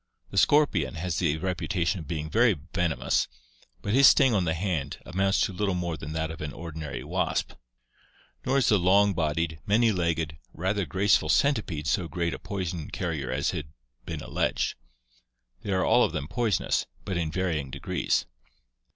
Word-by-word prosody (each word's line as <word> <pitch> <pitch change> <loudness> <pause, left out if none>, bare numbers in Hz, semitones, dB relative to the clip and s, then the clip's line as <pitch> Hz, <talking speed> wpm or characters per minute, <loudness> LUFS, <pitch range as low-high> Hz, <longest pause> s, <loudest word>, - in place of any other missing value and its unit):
The 100 - -5
scorpion 100 - +3
has 85 0 -2
the 80 -4 +1
reputation 90 0 -1
of 80 - -9
being 80 -1 -3
very 75 - +3 0.2
venomous; 85 -2 +1 0.6
but 100 - -1
his 135 +2 +8
sting 130 - +6
on 95 -4 +2
the 80 -1 0
hand 80 -6 -2
amounts 95 +2 +1
to 100 - +1
little 95 0 0
more 85 -2 -2
than 75 0 -7
that 80 0 -2
of 80 - -9
an 75 -1 -4
ordinary 80 -3 -6
wasp. - - -1 0.9
Nor 135 +2 +1
is 135 - +3
the 105 - +4
long 100 +3 +4
bodied, 80 -1 -1
many 110 +3 +4
legged, 80 -4 -1 0.2
rather 95 +3 -1
graceful 95 -2 +2
centipede 105 - +1
so 85 +3 0
great 85 +2 -2
a - - -6
poison 90 -5 -4
carrier 80 -8 -3
as - - 0
has 75 - -4 0.4
been - - -5
alleged. - - -1 0.9
They 100 - -4
are 95 -1 +2
all - - +5
of - - 0
them 70 - -3
poison 110 +1 0
ous, - - 0 0.2
but 95 - -2
in 80 -2 -1
varying 80 -5 -1
degrees. 70 -1 -1
85 Hz, 175 wpm, -27 LUFS, 80-95 Hz, 0.9 s, his